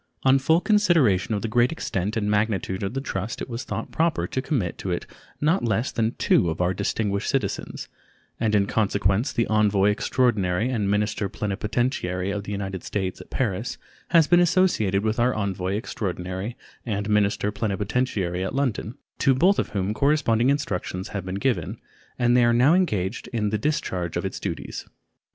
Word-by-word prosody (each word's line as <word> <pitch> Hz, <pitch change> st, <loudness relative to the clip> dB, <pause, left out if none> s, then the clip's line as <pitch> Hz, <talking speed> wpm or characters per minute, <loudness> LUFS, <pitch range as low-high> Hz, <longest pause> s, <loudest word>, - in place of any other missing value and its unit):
On 135 Hz, 0 st, +5 dB
full 160 Hz, +6 st, +3 dB
consideration 160 Hz, -, +3 dB
of 100 Hz, -, -3 dB
the -, -, 0 dB
great 120 Hz, +4 st, +3 dB
extent 105 Hz, -, -2 dB
and 105 Hz, -2 st, 0 dB
magnitude 105 Hz, -3 st, 0 dB
of 100 Hz, +5 st, -3 dB
the 135 Hz, -, -1 dB
trust 105 Hz, -4 st, -4 dB
it -, -, -4 dB
was 120 Hz, 0 st, -5 dB
thought -, -, -5 dB
proper 165 Hz, 0 st, +1 dB
to 130 Hz, -, -2 dB
commit 125 Hz, -, -1 dB
it -, -, -11 dB
to 90 Hz, -2 st, -2 dB, 0.4 s
not 160 Hz, +6 st, +2 dB
less 115 Hz, +2 st, 0 dB
than 115 Hz, +1 st, -1 dB
two 85 Hz, -, +3 dB
of 80 Hz, -, -4 dB
our 90 Hz, +1 st, +2 dB
distinguished 100 Hz, +1 st, -1 dB
citizens, -, -, -2 dB, 0.5 s
and 110 Hz, -2 st, +1 dB
in 100 Hz, -1 st, +3 dB
consequence 100 Hz, +2 st, +1 dB
the 115 Hz, -1 st, +1 dB
envoy 105 Hz, -2 st, +3 dB
extraordinary 105 Hz, -2 st, +1 dB
and 105 Hz, -5 st, 0 dB
minister 105 Hz, 0 st, 0 dB
plenipotentiary 100 Hz, -2 st, -2 dB
of 100 Hz, 0 st, -4 dB
the -, -, -5 dB
United 95 Hz, -2 st, -4 dB
States 95 Hz, -3 st, -3 dB
at -, -, -14 dB
Paris 110 Hz, -2 st, -2 dB, 0.3 s
has 165 Hz, -2 st, +5 dB
been 175 Hz, -, +5 dB
associated 170 Hz, -, +2 dB
with 110 Hz, +1 st, 0 dB
our 125 Hz, +1 st, +2 dB
envoy 95 Hz, -2 st, -2 dB
extraordinary 95 Hz, 0 st, -4 dB, 0.3 s
and 105 Hz, -3 st, -2 dB
minister 105 Hz, -1 st, +1 dB
plenipotentiary 100 Hz, -3 st, -1 dB
at 95 Hz, -, -3 dB
London, 125 Hz, -4 st, -1 dB, 0.2 s
to 135 Hz, -2 st, +4 dB
both 185 Hz, +9 st, +4 dB
of -, -, -1 dB
whom 100 Hz, 0 st, -1 dB
corresponding 135 Hz, -3 st, +2 dB
instructions 100 Hz, -8 st, -2 dB
have 100 Hz, -3 st, -4 dB
been 95 Hz, 0 st, -4 dB
given, 125 Hz, +5 st, -1 dB, 0.4 s
and 120 Hz, 0 st, +3 dB
they 125 Hz, -, +5 dB
are 120 Hz, 0 st, +4 dB
now 125 Hz, +7 st, +5 dB
engaged 110 Hz, -, 0 dB
in 105 Hz, -3 st, -1 dB
the 110 Hz, -, +1 dB
discharge 95 Hz, -, -1 dB
of -, -, -2 dB
its -, -, -4 dB
duties. -, -, -5 dB
105 Hz, 180 wpm, -24 LUFS, 100-125 Hz, 0.5 s, On